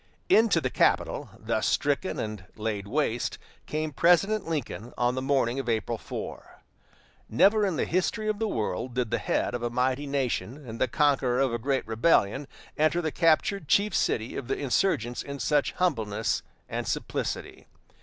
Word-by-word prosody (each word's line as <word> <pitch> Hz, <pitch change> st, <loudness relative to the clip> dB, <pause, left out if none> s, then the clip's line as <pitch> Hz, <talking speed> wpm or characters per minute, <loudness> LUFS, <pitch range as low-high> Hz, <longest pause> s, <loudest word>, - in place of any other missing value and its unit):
Into 225 Hz, -, +5 dB
the 130 Hz, -5 st, -2 dB
capital, -, -, +1 dB
thus -, -, -1 dB
stricken 145 Hz, +6 st, 0 dB
and 105 Hz, -3 st, -4 dB
laid 105 Hz, -2 st, -3 dB
waste, 120 Hz, -1 st, -1 dB, 0.3 s
came 155 Hz, 0 st, -2 dB
President 180 Hz, +7 st, +3 dB
Lincoln 125 Hz, -6 st, -4 dB
on 120 Hz, 0 st, +2 dB
the 130 Hz, -, -2 dB
morning 135 Hz, -2 st, +1 dB
of 130 Hz, -3 st, -3 dB
April 115 Hz, 0 st, -1 dB
4. -, -, -8 dB, 0.7 s
Never 205 Hz, -, +4 dB
in 185 Hz, -, -1 dB
the -, -, 0 dB
history 185 Hz, +5 st, 0 dB
of 215 Hz, -1 st, -1 dB
the 225 Hz, -, 0 dB
world 115 Hz, -, -2 dB
did 125 Hz, -3 st, -1 dB
the -, -, +1 dB
head -, -, 0 dB
of 120 Hz, -, -3 dB
a 120 Hz, -, -1 dB
mighty 130 Hz, +4 st, 0 dB
nation 135 Hz, 0 st, -2 dB
and 115 Hz, 0 st, -7 dB
the 130 Hz, -, +4 dB
conqueror 135 Hz, -2 st, +2 dB
of 135 Hz, -3 st, +2 dB
a 120 Hz, -, -1 dB
great 135 Hz, +3 st, 0 dB
rebellion 115 Hz, +2 st, +2 dB, 0.3 s
enter 155 Hz, +3 st, +3 dB
the 160 Hz, -3 st, -1 dB
captured 165 Hz, +2 st, +2 dB
chief 205 Hz, +7 st, +3 dB
city 110 Hz, +1 st, 0 dB
of 125 Hz, -, -5 dB
the -, -, -1 dB
insurgents 125 Hz, -, 0 dB
in 140 Hz, 0 st, -6 dB
such 145 Hz, +3 st, +1 dB
humbleness 115 Hz, -, 0 dB, 0.3 s
and -, -, -4 dB
simplicity. -, -, -3 dB
135 Hz, 170 wpm, -27 LUFS, 120-165 Hz, 0.7 s, Into